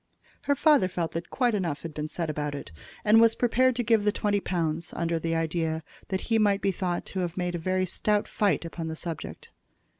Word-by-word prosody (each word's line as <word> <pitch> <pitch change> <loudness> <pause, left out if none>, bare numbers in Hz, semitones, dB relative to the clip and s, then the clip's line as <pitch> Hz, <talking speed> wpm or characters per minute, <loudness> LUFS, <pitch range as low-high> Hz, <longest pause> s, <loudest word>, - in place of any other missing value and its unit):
Her 285 - +5
father 290 - +4
felt 175 -3 -3
that 170 +1 -5
quite 245 -3 +1
enough 170 -8 -2
had 165 -2 -6
been 150 +1 -3
said 165 +1 -3
about 150 -1 -3
it, 140 - -8 0.3
and 215 +2 +7
was 230 0 +5
prepared 255 +1 +3
to 245 - 0
give 225 -2 +3
the 210 - +3
twenty 205 0 0
pounds, 165 -3 -2
under 170 -1 0
the 165 0 -1
idea 160 0 -1 0.2
that 190 -1 -2
he 225 -1 +1
might 205 -2 +3
be 195 - +3
thought 180 -1 -2
to 190 - -5
have 175 -1 -3
made 180 -1 -1
a 185 +2 0
stout 210 +3 0
fight 205 -4 +1
upon 165 0 -5
the 160 - -4
subject. 165 -1 -6
180 Hz, 215 wpm, -27 LUFS, 165-210 Hz, 0.3 s, and